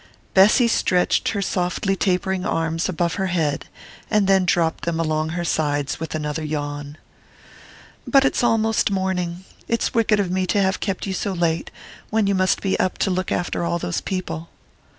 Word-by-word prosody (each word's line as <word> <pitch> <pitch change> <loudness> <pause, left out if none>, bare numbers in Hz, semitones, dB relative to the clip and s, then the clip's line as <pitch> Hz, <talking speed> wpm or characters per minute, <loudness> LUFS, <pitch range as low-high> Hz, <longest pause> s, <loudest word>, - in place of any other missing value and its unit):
Bessy 210 +6 +6
stretched 180 -5 +2
her 200 -2 -1
softly 185 +2 -1
tapering 190 -1 0
arms 165 +1 -1
above 170 -1 0
her 190 - +1
head 160 -5 -1 0.4
and 210 -2 +3
then 190 -1 +4
dropped 170 -2 +1
them 170 -1 -1
along 155 -1 0
her 175 +1 -3
sides 145 -3 -1
with 160 0 -4
another 150 0 -3
yawn. 145 -1 -4 1.1
"But 275 -1 +5
it's 265 - +1
almost 225 -2 +2
morning 190 -2 -2 0.2
it's 230 - 0
wicked 220 -2 +3
of 190 -3 0
me 185 0 0
to 205 - +1
have 190 -1 +1
kept 195 -3 -2
you 195 - -3
so 195 +1 -2
late, 170 -2 0 0.4
when 220 -1 +2
you 200 - +2
must 185 -1 +2
be 195 - 0
up 185 - 0
to 195 - 0
look 185 0 -2
after 175 -1 -1
all 170 0 0
those 90 - -3
people!" 180 -3 -4
180 Hz, 175 wpm, -22 LUFS, 165-195 Hz, 1.1 s, Bessy